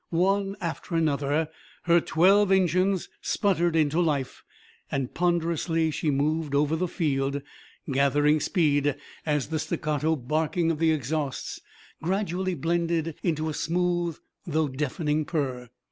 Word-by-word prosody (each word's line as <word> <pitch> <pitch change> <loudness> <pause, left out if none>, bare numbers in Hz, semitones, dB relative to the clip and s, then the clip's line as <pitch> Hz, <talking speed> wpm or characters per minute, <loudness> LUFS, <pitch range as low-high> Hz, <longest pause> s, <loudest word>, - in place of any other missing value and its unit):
One 195 +3 +1
after 170 -1 -4
another 150 -1 +1 0.4
her 170 0 +4
twelve 195 +6 +4
engines 185 0 +2
sputtered 175 -5 +1
into 155 0 +2
life, 145 -6 -1 0.5
and 135 -2 -2
ponderously 165 -2 +1
she 155 - -1
moved 150 +1 0
over 150 +2 +2
the 180 +3 -1
field, 140 -5 -1 0.5
gathering 145 +3 +3
speed 145 -4 +2 0.3
as 150 -2 0
the 160 -1 -1
staccato 155 +1 0
barking 155 +5 0
of 155 - -3
the 165 0 +3
exhausts 150 -1 -2 0.4
gradually 185 +1 -1
blended 165 -1 0
into 160 -2 0
a 155 - -2
smooth 175 +1 0 0.3
though 155 -2 +1
deafening 150 +3 -1
purr. 130 -6 -3
160 Hz, 125 wpm, -26 LUFS, 145-175 Hz, 0.5 s, her